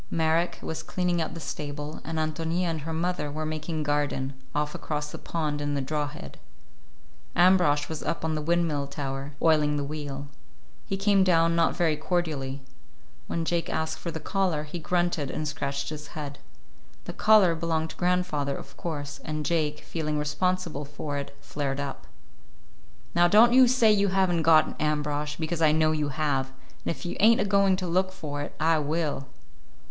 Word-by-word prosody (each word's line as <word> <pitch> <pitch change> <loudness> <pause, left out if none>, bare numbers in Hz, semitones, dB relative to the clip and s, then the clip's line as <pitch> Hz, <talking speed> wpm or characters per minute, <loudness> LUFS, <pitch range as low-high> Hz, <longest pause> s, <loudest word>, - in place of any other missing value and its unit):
Marek 165 +1 +1
was 160 0 -4
cleaning 175 +1 -1
out 160 - -3
the - - -5
stable, 145 -1 -5
and 160 0 -4
Ántonia 160 +3 -1
and 165 -3 -1
her 160 +3 -5
mother 165 -2 -1
were 155 +2 -4
making 155 0 -3
garden, 145 -2 -1 0.2
off 150 0 0
across 150 -1 -4
the - - -7
pond 150 -3 -2
in 145 0 -1
the - - 0
draw 145 +2 -1
head. 105 - -10 1.0
Ambrosch 175 -5 +4
was 160 -1 -5
up 165 - -2
on 160 - 0
the 155 - -1
windmill 160 -3 +1
tower, 140 0 -5
oiling 150 -2 +4
the 145 - -1
wheel. 145 -1 -5 0.6
He 195 - -1
came 195 -1 +4
down, 165 -2 +4
not 165 -1 +3
very 165 -3 +2
cordially. 150 -5 -2 0.6
When 165 -1 -2
Jake 170 0 0
asked 160 0 -2
for 170 - -4
the 160 - -4
collar, 185 -5 0
he 155 +3 -6
grunted 175 -4 0
and 155 - -3
scratched 140 -2 -3
his 150 -1 -7
head. 145 -2 -5 0.7
The - - -5
collar 210 -5 +5
belonged 160 -1 -1
to - - -11
grandfather, 175 -6 0
of 140 - -11
course, 145 -4 -5
and 155 0 -3
Jake, 150 -1 0
feeling 155 -2 -3
responsible 155 +1 -1
for 145 0 -4
it, 140 0 -8
flared 140 -2 -3
up. 140 -1 -5 1.1
"Now, 175 0 +5
don't 225 +6 +6
you 255 0 +8
say 240 -3 +5
you 200 -1 +3
have 190 -1 +2
n't 170 - +1
got 160 0 +6
it, - - -8
Ambrosch, 150 -1 -1
because 165 +1 -2
I 155 -2 +6
know 155 0 +3
you 150 -2 0
have, 140 -2 0 0.4
and - - -7
if 155 -3 -4
you 175 - -4
ain't 225 +4 +6
a - - +2
going 200 -1 +4
to 185 0 -3
look 185 +2 +1
for 150 -6 -5
it, 145 - -6
I 160 0 +3
will." 150 -2 -1
155 Hz, 185 wpm, -27 LUFS, 145-175 Hz, 1.1 s, you